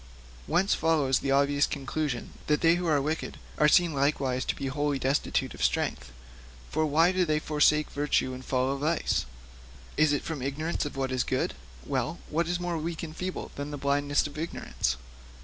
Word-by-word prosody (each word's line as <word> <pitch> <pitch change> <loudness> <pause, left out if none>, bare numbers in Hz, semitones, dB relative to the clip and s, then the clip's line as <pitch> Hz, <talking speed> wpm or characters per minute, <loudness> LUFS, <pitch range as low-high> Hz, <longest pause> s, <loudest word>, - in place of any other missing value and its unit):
Whence 185 +4 +2
follows 150 -5 +2
the 135 - -3
obvious 140 +1 +3
conclusion 140 -1 -3 0.2
that 150 0 +2
they 165 0 +6
who 175 0 -1
are 150 -3 +3
wicked 155 +3 -3 0.2
are 150 - +6
seen 170 +1 +4
likewise 135 -2 +1
to - - -1
be 140 - -5
wholly 145 +1 0
destitute 135 +2 0
of - - -5
strength. - - 0 0.6
For 155 0 +1
why 165 +4 +4
do 185 0 +2
they 155 -3 +1
forsake 150 0 +2
virtue 145 -2 0
and 130 0 -8
follow 130 +1 0
vice? 150 - 0 0.7
Is 155 -1 +4
it 145 - 0
from 160 -5 -4
ignorance 150 +6 -2
of 145 - -6
what 135 -1 -1
is 130 -1 +1
good? - - -1 0.3
Well, - - -1
what 165 +2 +1
is 175 0 -1
more 175 -2 -2
weak 165 +1 -4
and 160 -1 -6
feeble 185 +1 -4
than 145 +1 -5
the 145 - -5
blindness 145 +1 +1
of 150 0 -6
ignorance? 110 - -2
150 Hz, 185 wpm, -28 LUFS, 135-160 Hz, 0.7 s, they